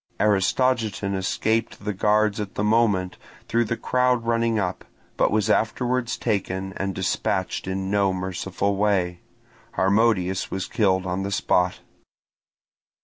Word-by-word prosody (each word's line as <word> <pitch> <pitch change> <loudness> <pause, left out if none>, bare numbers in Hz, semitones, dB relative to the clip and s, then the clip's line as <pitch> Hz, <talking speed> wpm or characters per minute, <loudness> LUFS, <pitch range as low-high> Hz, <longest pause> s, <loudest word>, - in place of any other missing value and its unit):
Aristogiton 105 0 +1
escaped 105 +3 -1
the 105 - -1
guards 105 +2 +2
at 100 -2 -5
the 105 - -1
moment, 105 -4 +2 0.3
through 115 0 +1
the 115 +2 -2
crowd 125 -2 +1
running 115 -1 +1
up, 90 -3 -2 0.3
but - - +2
was 105 -1 +1
afterwards 120 +3 0
taken 95 -3 -2
and 95 -1 -2
dispatched 95 0 -1
in 95 0 -3
no 100 -2 +2
merciful 95 +2 -2
way: 95 -4 +1 0.5
Harmodius 95 -2 +2
was 95 0 -3
killed 95 -3 +1
on 90 +1 -2
the 100 - -3
spot. 90 -2 +1
100 Hz, 130 wpm, -24 LUFS, 95-110 Hz, 0.5 s, guards